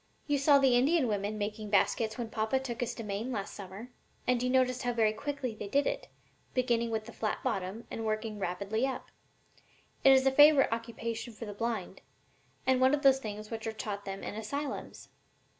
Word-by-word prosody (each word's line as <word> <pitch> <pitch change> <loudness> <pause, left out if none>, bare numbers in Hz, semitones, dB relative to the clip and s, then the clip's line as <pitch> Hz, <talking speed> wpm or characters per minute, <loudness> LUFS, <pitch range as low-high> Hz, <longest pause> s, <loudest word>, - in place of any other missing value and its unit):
You 290 -1 +1
saw 280 +1 +6
the 265 -3 +4
Indian 275 +3 +3
women 205 0 -1
making 210 +1 -4
baskets 220 +2 +2
when 235 -2 -4
papa 220 +4 0
took 250 -3 -5
us 240 0 -2
to 230 - -6
Maine 210 +4 -3
last 200 -5 -4
summer, 200 +5 -9 0.3
and 250 -1 +2
you 250 - 0
noticed 255 0 +2
how 245 0 0
very 220 -2 +3
quickly 275 -1 -3
they 210 -1 -7
did 280 +7 +2
it, - - -2 0.5
beginning 240 -2 +1
with 220 -1 -2
the 235 - -10
flat 215 - -2
bottom 195 +4 -2
and 225 - -4
working 215 -1 -2
rapidly 200 +6 -1
up. 265 - -6 0.9
It 270 - +8
is 265 0 +5
a 270 - +5
favorite 290 -2 +7
occupation 230 0 -4
for 225 - -8
the 205 - -6
blind, 215 -4 -3 0.6
and 260 -1 +3
one 260 +3 +5
of 290 - -6
the 270 -1 +8
things 215 -4 -6
which 225 -1 -4
are - - -1
taught 210 -2 -5
them 195 0 -5
in - - -4
asylums." 265 +7 -5
230 Hz, 200 wpm, -31 LUFS, 215-260 Hz, 0.9 s, It